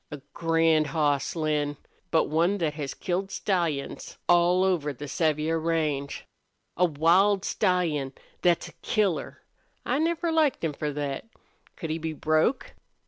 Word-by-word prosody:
A 150 - -7
grand 165 -2 +2
hoss, 145 -2 0
Lin, 150 -2 -1 0.3
but 160 - +3
one 170 +6 +1
thet 160 -5 -1
has 145 -3 -5
killed 190 +2 -2
stallions 170 -9 -2
all 175 +1 +4
over 175 -6 +1
the 145 +2 -8
Sevier 155 +2 0
range. 155 -4 -1 0.5
A 180 - +4
wild 180 +6 +3
stallion 165 -9 0 0.3
thet's 175 -2 +2
a - - -17
killer! 200 -6 -1 0.4
I 255 +4 0
never 335 +1 0
liked 315 - +2
him 160 -2 0
for 150 +1 -3
thet. 145 +5 -4 0.5
Could 165 -4 -5
he 160 - -2
be 160 0 -3
broke?" 155 - +1
165 Hz, 140 wpm, -27 LUFS, 150-180 Hz, 0.5 s, all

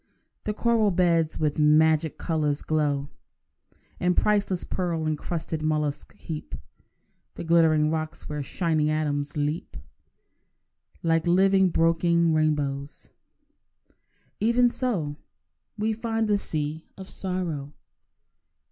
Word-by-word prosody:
The 210 - -1
coral 230 -2 +2
beds 170 -3 +1
with 150 -1 0
magic 155 +1 +4
colours 150 -3 -1
glow, 145 -2 0 0.9
And 180 0 +1
priceless 200 -3 +1
pearl 170 -3 -2
encrusted 155 +1 -3
molluscs 150 -2 -2
heap 155 -2 -6 0.8
The - - -6
glittering 160 -2 +4
rocks 155 -1 -4
where 150 -1 -4
shining 155 +1 0
atoms 150 -1 -1
leap 150 +3 -2 1.3
Like 165 0 +1
living 190 +1 +4
broken 165 0 +2
rainbows. 145 -3 -1 1.3
Even 235 +3 +4
so 185 - -2 0.6
We 215 +1 0
find 225 0 -1
the 205 -1 +2
sea 155 -2 -4
of 190 -1 -9
sorrow. 175 -8 -4
160 Hz, 105 wpm, -26 LUFS, 150-185 Hz, 1.3 s, magic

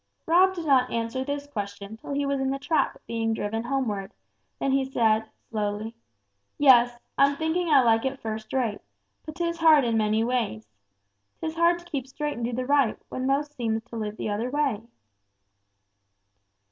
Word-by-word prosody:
Rob 370 +3 +4
did 340 -2 -5
not 260 -4 +4
answer 230 +3 -2
this 285 +1 -4
question 205 -5 -6
till 225 +5 -7
he 285 0 0
was 280 0 0
in 265 0 0
the 270 - -1
trap 310 +3 0
being 225 -1 -1
driven 225 +2 -3
homeward; 225 -7 -2 0.5
then 275 - 0
he 270 0 +2
said, 220 -4 +1 0.2
slowly, 210 0 -3 0.6
"Yes, 245 -4 +5 0.2
I'm 280 +1 +5
thinking 320 +3 -1
I 280 -4 +6
like 225 -1 +3
it 265 0 -2
first 220 -1 -5
rate, 240 -6 -1 0.5
but 310 - -7
'tis 340 -1 -2
hard 315 -4 +6
in 230 -2 +1
many 215 +1 +2
ways. 225 - -1 0.7
'Tis 315 -1 -3
hard 340 +1 +3
to 345 - -14
keep 280 -7 -4
straight 295 +2 -3
and 235 - -5
do 235 - -1
the 255 +2 -2
right, 280 -4 +2
when 255 0 -3
most 290 +2 0
seems 225 -4 -2
to - - -9
live 215 -1 -4
the - - -3
other 225 +4 -2
way." 275 -6 0
255 Hz, 180 wpm, -26 LUFS, 225-285 Hz, 0.7 s, I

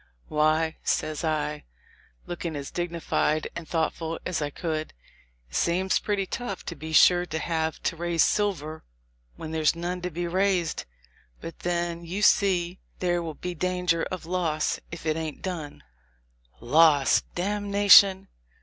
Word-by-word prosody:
"Why," 155 +1 +1
says 155 +1 -1
I, 150 -2 -1 0.6
looking 170 -2 -5
as 140 -1 -6
digni 175 -1 -3
fied 155 0 0
and 170 -1 -6
thoughtful 165 0 -2
as 180 -4 -2
I 145 - -1
could, 155 0 -4 0.5
"it - - -12
seems 185 +2 +1
pretty 200 -2 -1
tough, 200 0 -5
to 170 - -5
be 160 0 -8
sure, 175 +2 +5
to 160 - -3
have 160 -1 -2
to - - 0
raise 170 0 +1
silver 165 -7 -1 0.5
where 160 - -7
there's 160 0 +1
none 175 +2 -4
to 180 - -3
be 175 +1 -4
raised; 185 -1 0 0.5
but 165 - -9
then 170 -1 -2
you 185 +5 -4
see, 180 -3 +3 0.2
'there 175 -1 0
will 160 -2 -5
be 180 0 -5
danger 180 -1 0
of 185 -3 -6
loss' 165 -3 -1
if 165 -1 -8
it 155 0 0
ain't 160 -2 -5
done." 165 - -5 0.8
"Loss! 145 +2 +4
damnation 200 0 +5
170 Hz, 150 wpm, -26 LUFS, 155-180 Hz, 0.8 s, sure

